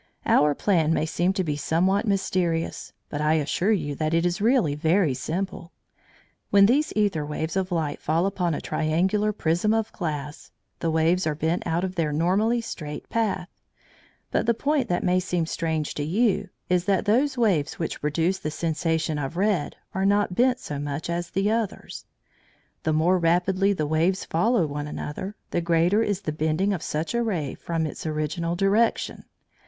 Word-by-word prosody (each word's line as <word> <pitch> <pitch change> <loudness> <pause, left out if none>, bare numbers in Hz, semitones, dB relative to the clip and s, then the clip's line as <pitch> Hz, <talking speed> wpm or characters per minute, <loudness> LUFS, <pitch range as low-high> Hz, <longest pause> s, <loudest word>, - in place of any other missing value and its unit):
Our 150 0 +4
plan 165 -5 +2
may - - +1
seem 175 +3 +1
to 190 - 0
be 150 -4 -1
somewhat 185 +8 +1
mysterious, 180 -4 -1 0.2
but 145 - -3
I 155 +1 +3
assure 160 +6 +1
you 150 -9 0
that 155 +1 0
it 165 +1 +2
is 175 +2 -1
really 225 - +3
very 160 +1 +2
simple. 170 +6 -4 0.8
When 200 -1 +6
these 275 +8 +2
æther 195 -8 0
waves 160 +2 -3
of 190 -1 -1
light 155 -4 -2
fall 165 +4 +1
upon 180 -5 0
a - - -4
triangular 185 +8 +1
prism 195 +3 +1
of 225 -1 -1
glass, 150 -4 -5 0.3
the 165 - -1
waves 160 +3 +2
are 155 - 0
bent 160 +3 -1
out 170 +2 0
of 185 -1 -2
their 165 -4 0
normally 195 +10 +2
straight 150 -9 -7
path. 220 -5 -1 0.8
But - - 0
the 235 - +3
point 275 -1 0
that 175 - 0
may 180 +1 +3
seem 180 -2 -1
strange 160 -2 -2
to 145 - -3
you, 200 +3 +1 0.2
is 180 -1 +1
that 195 -2 +1
those 260 +6 +2
waves 190 -12 +1
which 165 -4 -4
produce 165 +5 0
the 155 - -3
sensation 160 -1 -1
of 140 +4 -4
red 195 -5 0 0.2
are 190 - -1
not 200 -1 +2
bent 250 +5 +3
so 145 -1 -5
much 145 +3 -3
as 175 0 -3
the 195 +2 0
others. 225 -3 -3 0.8
The 160 - 0
more 170 +4 +3
rapidly 180 +4 +2
the 155 -6 -1
waves 165 +5 +1
follow 200 +3 +2
one 145 0 -4
another, 190 +7 -5 0.2
the 175 - 0
greater 170 +5 +3
is 205 -3 -1
the 160 - -3
bending 160 +6 0
of 175 - -3
such 155 +6 -3
a 235 - +1
ray 175 - -1
from 165 -1 -2
its 155 - -5
original 155 +3 -2
direction. 200 +5 +1
175 Hz, 180 wpm, -25 LUFS, 155-200 Hz, 0.8 s, When